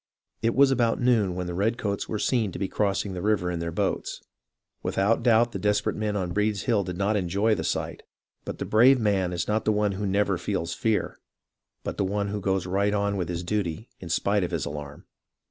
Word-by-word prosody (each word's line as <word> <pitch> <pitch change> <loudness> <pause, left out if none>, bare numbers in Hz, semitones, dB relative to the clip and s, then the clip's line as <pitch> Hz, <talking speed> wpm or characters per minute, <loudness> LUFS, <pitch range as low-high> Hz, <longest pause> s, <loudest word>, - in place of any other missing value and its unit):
It 115 0 +1
was 140 0 +6
about 120 -3 +2
noon 115 -7 +2
when 90 0 -3
the 90 - -4
redcoats 100 +1 -1
were 110 - -1
seen 110 -2 +1
to - - -5
be 95 - -1
crossing 100 0 -1
the 90 - -4
river 100 -3 +1
in 85 - -3
their 85 0 -3
boats. - - -2 0.6
Without 100 +5 +1
doubt 120 0 +4
the 100 - -4
desperate 105 +1 +1
men 105 -1 -2
on 90 -3 -2
Breed's 105 0 0
Hill 115 -5 +2
did 90 -1 -5
not 100 +2 +1
enjoy 100 +3 +1
the - - -2
sight; - - -2 0.4
but - - -6
the - - -4
brave 125 +5 +5
man 100 -5 +1
is 85 -1 -2
not 110 +1 +1
the 110 - +2
one 105 -1 +1
who 100 +1 -3
never 100 -1 +1
feels 85 -3 -2
fear, 110 -2 -1 0.6
but - - -4
the - - +1
one 100 +1 -1
who 105 0 -3
goes 95 -2 0
right 100 +3 +1
on 100 0 0
with 90 -3 -2
his 85 0 -3
duty 105 +2 -2
in 90 - -8
spite 100 +4 +1
of 90 - -1
his 85 -4 -2
alarm. 75 0 -7
100 Hz, 220 wpm, -26 LUFS, 90-110 Hz, 0.6 s, was